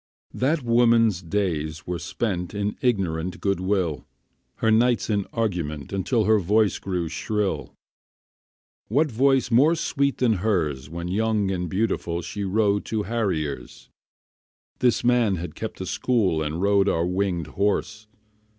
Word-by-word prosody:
That 145 +3 0
woman's 115 -4 +3
days 80 -4 -2
were 90 -1 -3
spent 90 +2 -3
In 105 0 -2
ignorant 90 -8 -1
good 100 -2 0
will, 90 -7 -1 0.5
Her 110 - +1
nights 115 +1 +2
in 100 -2 0
argument 85 - -3
Until 105 +4 +1
her 110 0 +4
voice 105 +3 +2
grew 90 -3 -2
shrill. 105 +5 -2 1.1
What 145 +6 +1
voice 130 +1 +2
more 145 +8 +5
sweet 140 -4 0
than 115 -5 +2
hers 75 -10 -1
When 85 +2 -5
young 105 +1 0
and 90 -2 -2
beautiful, 95 -4 -1
She 105 - -5
rode 100 +1 +1
to 110 -1 -2
harriers? 95 -11 -3 0.9
This 125 -2 +2
man 120 -5 +3
had 85 -2 -6
kept 110 -3 -6
a - - -3
school 95 -7 +1
And 80 +4 -2
rode 100 0 +3
our 85 +1 +1
winged 90 -2 -1
horse. 100 +5 -2
100 Hz, 140 wpm, -24 LUFS, 85-115 Hz, 1.1 s, more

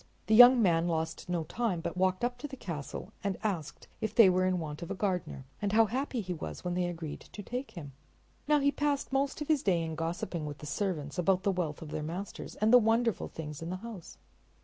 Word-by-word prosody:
The 220 - +1
young 245 +2 +10
man 170 -2 +3
lost 160 +1 -2
no 175 -2 0
time, 200 +2 -1
but 165 - -4
walked 185 +2 +1
up 245 0 -1
to 295 - -5
the 270 -2 -9
castle 170 - -6
and 200 -2 -1
asked 180 -8 -3
if 220 - -2
they 210 -5 +8
were 185 0 +2
in 185 -1 +1
want 155 -1 -5
of 170 - -6
a - - -2
gardener; 180 -8 -2 0.2
and 205 -1 -1
how 225 +1 +6
happy 255 +2 -2
he 180 -2 -4
was 160 - -7
when 180 -1 -2
they 180 0 0
agreed 165 -3 -5
to 205 - -10
take 250 +6 -4
him! 145 -5 -7 0.5
Now 300 0 +5
he 285 +1 +3
passed 285 -2 -1
most 275 +2 0
of 300 - -3
his 305 -4 +3
day 175 -4 +2
in 160 0 -4
gossiping 165 0 -3
with 145 -1 -6
the 150 - -10
servants 150 -1 -2
about 185 +1 +2
the 200 - +2
wealth 165 -5 -3
of 155 - -9
their - - -3
masters 175 +6 -6
and 215 +2 +2
the 250 - +10
wonderful 225 -1 +1
things 150 -2 -7
in 165 - -5
the 185 - -2
house. 215 -8 -9
185 Hz, 240 wpm, -31 LUFS, 165-225 Hz, 0.5 s, young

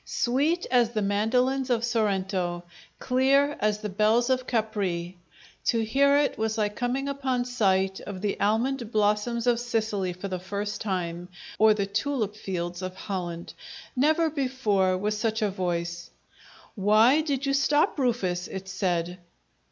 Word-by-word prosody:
Sweet 290 +8 0
as 240 -2 +3
the 215 - 0
mandolins 250 +6 +1
of 235 -2 +1
Sorento! 190 -6 -1 0.3
Clear 275 +3 +2
as 210 0 0
the 210 - -3
bells 220 +5 +2
of 255 0 0
Capri! 195 -6 -2 0.5
To 230 - +2
hear 280 +5 +4
it, 290 -5 +1
was 220 0 -1
like 210 -1 0
coming 250 +3 -1
upon 265 -3 -1
sight 195 -6 +1
of 200 -2 -7
the 205 -1 -2
almond 230 +3 0
blossoms 215 +2 +1
of 240 -1 +3
Sicily 220 -6 -1
for 180 +3 -6
the 185 -2 -4
first 205 +3 -4
time, 180 -4 -3 0.3
or 215 -1 +6
the 200 -2 0
tulip 215 0 -2
fields 175 -3 -4
of 185 0 -5
Holland. 175 -4 -5 0.4
Never 315 +5 +2
before 225 -10 +1
was 210 +3 -1
such 220 +1 -1
a 205 - +1
voice! 175 -2 -3 0.6
"Why 220 +8 +4
did 280 -3 -2
you 275 - +1
stop, 290 +2 +2
Rufus?" 190 -9 0
it 190 0 -7
said. 180 -2 -2
215 Hz, 150 wpm, -26 LUFS, 190-250 Hz, 0.6 s, or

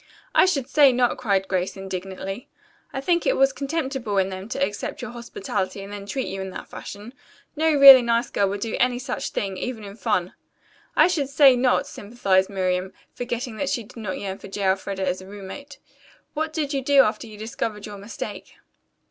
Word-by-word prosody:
"I - - +6
should 275 -9 0
say 285 -3 +6
not," 245 -1 +1
cried 195 -5 +1
Grace 185 0 -1
indignantly. 195 +3 -6 0.4
"I 270 - -4
think 340 +3 +1
it - - +2
was 270 0 +4
contemptible 270 -7 -2
in 190 0 +2
them 190 +2 -7
to 265 - -3
accept 205 - -5
your - - -5
hospitality 200 -4 -4
and 200 +1 -9
then 200 -1 -7
treat 265 +5 -2
you 195 0 -5
in 190 - -5
that - - -8
fashion. 210 +4 -9 0.4
No 320 +1 +2
really 275 -2 +11
nice 235 0 0
girl 200 -1 +1
would 200 +1 -4
do 225 0 -2
any 250 0 +2
such 250 - -4
thing, 195 -2 -3
even 235 +1 -4
in 200 0 -9
fun." 210 -6 -1 0.6
"I - - +7
should 305 -7 -1
say 275 -2 +6
not," 250 +1 +2
sympathized 195 -4 0
Miriam, 185 -1 -1 0.2
forgetting 240 -1 -4
that 285 - -1
she 240 -5 -1
did 210 - -16
not 210 -5 -4
yearn 195 -1 -5
for - - -10
J. 200 +1 -5
Elfreda 190 0 -1
as 185 +1 -1
a 190 - -12
roommate. 205 +9 -9 0.6
"What 315 +1 -2
did 305 -2 -2
you 275 - 0
do 275 +1 +6
after 215 +2 -2
you 215 -1 -11
discovered 215 -1 -4
your 205 -1 -8
mistake?" 205 +3 -7
220 Hz, 200 wpm, -24 LUFS, 195-265 Hz, 0.6 s, really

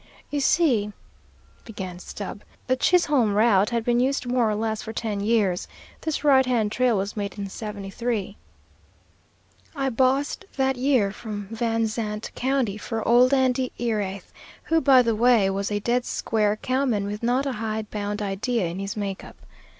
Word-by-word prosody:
"You 290 - 0
see," 265 -8 +2 0.7
began 190 -5 -7
Stubb, 200 +2 -7 0.2
"the 255 - +2
Chisholm 275 - +3
route 210 -2 +4
had 235 -2 -1
been 240 0 +2
used 265 +1 0
more 245 -2 +1
or 210 - 0
less 220 0 -2
for 220 - -6
ten 215 -3 -3
years. 205 -4 +1 0.3
This 315 -2 -2
right 270 -3 +6
hand 235 -5 0
trail 245 -2 +2
was 195 +2 -3
made 200 -1 -4
in 200 -1 -4
'73. 210 +1 -4 1.4
I 270 -2 0
bossed 270 +8 +1
that 265 0 +2
year 250 -6 +2
from 205 -2 -7
Van 225 0 0
Zandt 215 -1 -4
County, 255 -5 0
for 225 +1 -4
old 245 +2 +5
Andy 260 -1 +2
Erath, 205 -5 -3 0.3
who, 325 0 +2
by 265 -4 +6
the 230 -2 +1
way, 225 -4 +4
was 200 +1 -2
a 205 - 0
dead 240 +4 0
square 210 -2 0
cowman 255 -3 0
with 205 +1 -5
not 250 +4 +1
a 275 - -1
hide 220 -2 -4
bound 205 0 -3
idea 205 +2 -1
in 170 +2 -4
his 195 +2 -4
make 195 -2 -3
up. - - -13
225 Hz, 165 wpm, -24 LUFS, 205-255 Hz, 1.4 s, right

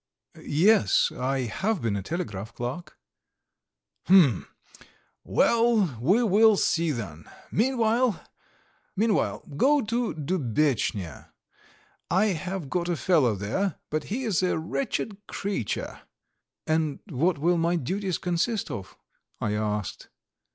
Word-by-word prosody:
"Yes, 195 +8 +3
I 130 +1 -1
have 190 - -1
been 110 -3 0
a 100 - -2
telegraph 115 - -5
clerk." 125 +9 -6 1.1
"Hm! 165 - +5 0.8
Well, 230 - +2
we 195 - +3
will 215 0 +5
see 165 -2 +1
then. 95 - -5 0.3
Meanwhile, 235 -1 +1 0.7
go 220 - +1
to 235 +1 -1
Dubetchnya. 140 - -1 0.8
I 190 +4 +3
have 185 -2 -3
got 175 +4 -2
a 175 - 0
fellow 150 - +3
there, 150 - -2 0.2
but 155 0 -1
he 245 +6 -3
is 215 -8 +1
a 185 - +1
wretched 205 +3 -3
creature." 195 - -4 0.6
"And 155 -2 0
what 165 +4 +1
will 170 +4 +2
my 170 +1 +1
duties 185 +5 -2
consist 180 +5 -1
of?" 95 -2 -7 0.4
I 105 - -1
asked. 105 -2 -3
175 Hz, 110 wpm, -26 LUFS, 130-205 Hz, 1.1 s, Hm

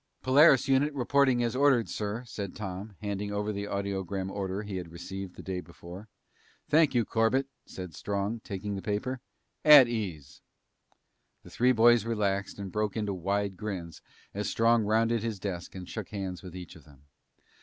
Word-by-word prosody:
"Polaris 135 +1 +6
unit 135 +2 +3
reporting 130 -1 +3
as 120 +1 -1
ordered, 135 -4 +4
sir," 105 +3 -4
said 100 -5 -6
Tom, 100 +1 -6
handing 100 0 -3
over 105 +1 -2
the 100 0 -4
audiogram 100 -1 -3
order 100 0 -3
he 100 -2 -5
had 85 -3 -7
received 90 +2 -7
the - - -10
day 95 -1 -3
before. 90 +4 -11 0.6
"Thank 155 -3 +4
you, 120 -2 +3
Corbett," 115 +4 +2 0.2
said 90 -3 -8
Strong, 100 +6 -3
taking 100 -1 -5
the 95 - -5
paper. 110 +6 -2 0.4
"At 150 -4 +9
ease." 90 - -5 1.0
The - - -14
three 125 +2 +3
boys 120 -1 +5
relaxed 100 -3 -1
and 100 -2 -6
broke 105 +1 -1
into 105 -2 -1
wide 100 +2 -1
grins 90 -5 -6 0.3
as 105 +1 -2
Strong 115 -1 +3
rounded 115 +2 +2
his 115 -2 -3
desk 90 -3 -5
and 90 -1 -7
shook 110 +1 -6
hands 95 -4 -5
with 90 -1 -10
each 90 -3 -9
of - - -15
them. 70 -2 -20
105 Hz, 170 wpm, -29 LUFS, 95-115 Hz, 1.0 s, At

